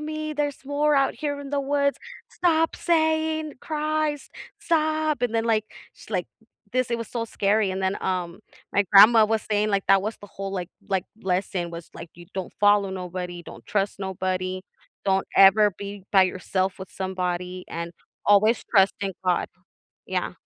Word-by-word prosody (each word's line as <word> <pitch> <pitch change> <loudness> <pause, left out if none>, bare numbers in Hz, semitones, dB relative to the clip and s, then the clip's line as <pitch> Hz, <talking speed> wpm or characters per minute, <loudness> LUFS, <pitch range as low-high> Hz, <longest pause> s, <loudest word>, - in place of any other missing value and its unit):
me, 310 0 -4
there's 290 -2 -2
more 290 +2 +1
out 275 0 +2
here 285 -2 -3
in 275 - -8
the 285 -1 0
woods. 280 0 0 0.3
Stop 325 -2 +1
saying 315 -2 +1
Christ! 310 -2 -2 0.3
Stop!" 310 -6 0
and 240 -2 +1
then, 225 0 +1
like, 220 -2 +2 0.3
she, - - -13
like - - -1 0.5
this 255 -1 0
it 235 - +1
was 230 - -6
so 230 -2 -3
scary, 205 -1 +1
and 190 +1 -3
then, 190 +1 -1
um, 180 0 -2 0.3
my 200 - +3
grandma 215 +3 +9
was 220 0 0
saying, 210 0 0
like, 200 -1 +1
that 195 0 +6
was 215 +2 -3
the 205 - -12
whole, 195 0 -4
like 180 -2 -4 0.2
like, 190 -3 0 0.2
lesson, 180 -2 -1
was, 170 -1 -9
like, 165 - -9
you 175 0 -13
don't 190 -2 -4
follow 205 -1 +4
nobody, 180 -1 -5
don't - - -12
trust 200 -1 -1
nobody, 185 -1 -3 0.4
don't 195 -1 +1
ever 205 +2 +7
be 200 -1 -8
by 190 -1 +7
yourself 185 +1 -1
with 190 - -9
somebody, 180 -1 -3
and 170 +1 -5 0.3
always 210 +3 +4
trust 195 -3 +5
in 195 -1 -1
God. 180 -1 +1 0.6
Yeah, - - -2
205 Hz, 175 wpm, -25 LUFS, 185-285 Hz, 0.6 s, grandma